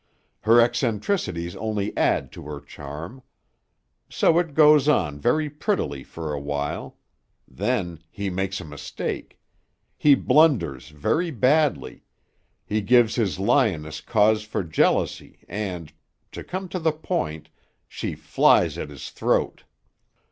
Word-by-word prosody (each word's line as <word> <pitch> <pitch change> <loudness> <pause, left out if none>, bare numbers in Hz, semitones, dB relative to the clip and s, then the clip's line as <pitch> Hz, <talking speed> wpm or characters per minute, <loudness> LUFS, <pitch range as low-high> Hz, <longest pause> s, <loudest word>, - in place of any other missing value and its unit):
Her 115 +2 +5
eccentricities 105 - 0
only 105 -2 -3
add - - +1
to - - -10
her 75 -1 -6
charm. 75 - -9 0.9
So 165 - +3
it 165 -5 -3
goes 150 -1 +6
on 75 - +1
very 155 - +1
prettily 145 - -2
for 80 -2 -6
a 70 - -3
while. 70 0 -4 0.5
Then 80 +5 -2
he 100 0 -5
makes 95 +1 -2
a - - -8
mistake. 75 -1 -6 0.6
He 145 -2 +5
blunders 110 - +2
very 155 - -1
badly. 135 - +1 0.6
He 105 +1 -1
gives 120 +1 +4
his 105 -7 0
lioness 95 - +1
cause 110 -1 +3
for 105 -2 -3
jealousy 80 -2 0
and 90 -5 -5 0.4
to - - -8
come 185 +1 -5
to 185 - -3
the 160 -2 +1
point 155 - -3 0.4
she - - -5
flies - - +3
at - - -5
his 70 -3 -9
throat. - - -1
105 Hz, 125 wpm, -24 LUFS, -, 0.9 s, goes